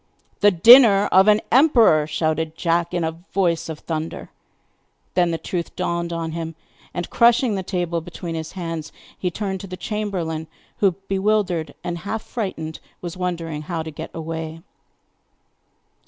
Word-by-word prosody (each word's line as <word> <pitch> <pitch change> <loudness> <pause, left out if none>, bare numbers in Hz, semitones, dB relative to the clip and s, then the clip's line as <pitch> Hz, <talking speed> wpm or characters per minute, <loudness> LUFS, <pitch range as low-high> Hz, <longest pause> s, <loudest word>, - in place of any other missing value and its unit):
'The 205 - +6
dinner 205 +2 +8
of 190 +2 +6
an 210 0 +6
emperor!' 235 - +5
shouted 160 0 -1
Jack 170 0 +1
in 175 - -1
a 160 - 0 0.2
voice 170 -4 +1
of 160 - -5
thunder. 160 0 -5 0.8
Then 175 -1 +3
the 165 - -1
truth 170 +1 -4
dawned 170 -1 -2
on 165 -1 -3
him; 165 0 -5 0.4
and, 175 - -4
crushing 235 0 +4
the 195 - -1
table 175 -3 -2
between 170 0 -7
his 160 -1 -5
hands, 165 -4 -5 0.2
he 180 - -2
turned 190 +1 -3
to 195 - -8
the 185 0 -7
chamberlain, 180 -8 -3 0.3
who, 195 -3 +3
bewildered 195 -4 0
and 175 -1 -3
half 220 +4 -4
frightened, 160 -9 -5 0.2
was 175 0 -6
wondering 170 -4 -3
how 160 +1 -4
to 160 - -7
get 150 - -7
away. 160 0 -6
175 Hz, 155 wpm, -22 LUFS, 160-195 Hz, 0.8 s, dinner